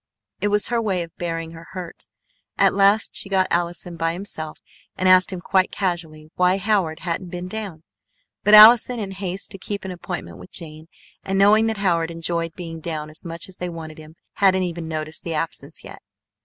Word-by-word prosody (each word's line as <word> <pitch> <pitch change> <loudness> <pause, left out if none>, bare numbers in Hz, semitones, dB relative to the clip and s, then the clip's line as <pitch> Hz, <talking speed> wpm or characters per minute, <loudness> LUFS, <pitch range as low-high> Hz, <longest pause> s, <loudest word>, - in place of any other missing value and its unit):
It 205 - 0
was 210 0 +1
her 235 -1 +1
way 190 -5 0
of 165 - -13
bearing 165 -1 -4
her 165 0 -12
hurt. 180 -3 -8 0.5
At - - +4
last 200 +2 +4
she 195 - -2
got 190 -1 +3
Allison 175 0 -1
by 165 0 0
himself 165 -4 -5 0.4
and 185 - 0
asked 185 +1 +6
him 185 -2 -5
quite 185 +1 +2
casually 165 -5 -3
why 180 +1 +3
Howard 190 -5 0
hadn't 175 +1 -3
been 180 +1 -5
down. 190 -6 -6 0.6
But 210 +1 +7
Allison, 230 +3 +9
in 200 -3 -4
haste 190 0 -4
to 195 - -6
keep 200 0 -5
an 190 - -4
appointment 175 0 -6
with - - -13
Jane, 155 -2 -7 0.4
and 195 0 -1
knowing 210 +3 +5
that 220 -1 -1
Howard 170 -4 +1
enjoyed 165 0 -3
being 165 -2 -7
down 155 -2 -5
as 155 - -8
much 170 -1 -5
as 190 - -12
they 180 - -4
wanted 160 -2 -8
him, 155 +1 -13 0.2
hadn't 190 -2 +4
even 170 -2 -4
noticed 155 0 -5
the 165 -2 -3
absence 155 -1 -4
yet. - - -11
175 Hz, 195 wpm, -22 LUFS, 165-195 Hz, 0.6 s, Allison